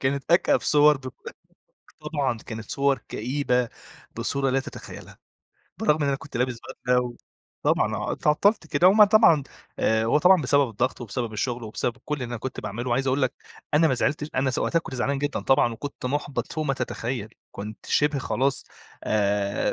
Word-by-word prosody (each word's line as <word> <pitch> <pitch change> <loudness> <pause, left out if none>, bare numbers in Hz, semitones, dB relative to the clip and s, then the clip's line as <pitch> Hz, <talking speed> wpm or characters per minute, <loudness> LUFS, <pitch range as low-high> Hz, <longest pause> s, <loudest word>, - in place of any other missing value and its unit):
كانت 140 +1 -1
أكأب 175 - +4
صور 150 0 +5
دو 130 -1 -8 0.9
طبعًا 135 -6 -1
كانت 110 -1 -8
صور 140 0 +1
كئيبة 125 0 0 0.5
بصورة 135 -1 0
لا 135 +1 +2
تتخيّلها، - - -10 0.6
بالرغم 150 0 +2
إن 140 - +1
أنا 140 - +1
كنت 140 0 -9
لابس 125 -1 -1 0.3
بدلة 125 0 +4
و 125 -1 -5 0.5
طبعًا - - +2
آه، - - -3
اتعطّلت 165 +5 +2
كده 175 +3 +4
وما 210 +2 +7
طبعًا 200 -8 +5 0.4
آآ 110 0 +2
هو 115 +6 +3
طبعًا 180 0 +5
بسبب 140 +1 +3
الضغط 120 +5 -2
وبسبب 120 0 -4
الشغل 120 +3 -2
وبسبب 115 +2 -3
كلّ 150 - -2
اللي 135 -4 -4
أنا 120 0 -4
كنت 125 +3 -6
باعمله، 120 +5 -4
وعايز 130 +3 +1
أقول 135 +1 +1
لك 130 0 +1 0.4
أنا 160 +2 +5
ما 130 - +2
زعلتش 145 +4 -1
أنا 130 +1 +1
س 125 - -2
وقتها 165 - +1
كنت 165 - -7
زعلان 135 +3 -1
جدًا 145 +1 -2
طبعًا 125 -3 +3
وكنت 135 +3 -6
مُحبَط 145 +1 -3
فوق 155 -1 -2
ما 135 -2 0
تتخيّل، 120 -3 -4 0.2
كنت 105 +2 -8
شِبه 150 -1 +2
خلاص 135 0 -1 0.4
آآ، 100 -1 0
130 Hz, 180 wpm, -25 LUFS, 120-145 Hz, 0.9 s, وما